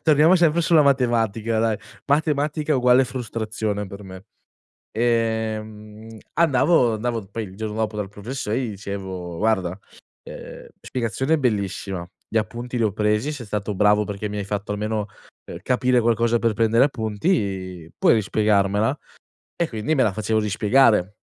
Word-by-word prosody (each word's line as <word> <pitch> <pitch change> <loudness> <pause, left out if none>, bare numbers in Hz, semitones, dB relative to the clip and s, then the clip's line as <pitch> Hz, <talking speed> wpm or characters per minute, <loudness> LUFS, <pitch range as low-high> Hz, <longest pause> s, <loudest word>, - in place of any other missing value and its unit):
torniamo 155 +3 +5
sempre 170 -1 +3
sulla 165 -2 +4
matematica, 115 -5 +1
dai, 110 -1 +1 0.3
matematica 150 0 +1
uguale 125 +1 +5
frustrazione 110 -4 -3
per 100 +1 -10
me. 95 0 -11 0.7
Ehm, 110 -1 -2 0.2
andavo 145 -6 +3
andavo 115 -1 -3
poi 110 +2 -4
il 95 -1 -11
giorno 110 0 -4
dopo 110 -1 -1
dal 105 -2 -3
professo 105 +4 -6
e 110 - +1
gli 130 -3 -2
dicevo: 95 -3 -6
"Guarda, 95 -4 0 0.5
uhm, - - -10
spiegazione 130 +6 -1
bellissima, 100 -7 -2 0.2
gli - - -5
appunti 120 +3 -2
li 120 - +1
ho 105 -3 +1
presi, 105 +6 0
sei 130 -6 -8
stato 105 0 -3
bravo 105 +1 +4
perché 105 0 -4
mi 105 - -5
hai 100 - -3
fatto 100 +1 -3
almeno, 105 0 -2 0.4
uhm, - - -8
capire 125 0 +2
qualcosa 115 0 +2
per 115 -1 +2
prendere 115 +3 +3
appunti, 100 - -2
puoi - - +5
rispiegarmela?" 105 +2 +1 0.6
E 170 - 0
quindi 115 +8 -1
me 135 - +3
la 105 - +2
facevo 110 +2 -1
rispiegare. 105 -1 +3
110 Hz, 150 wpm, -22 LUFS, 105-125 Hz, 0.7 s, torniamo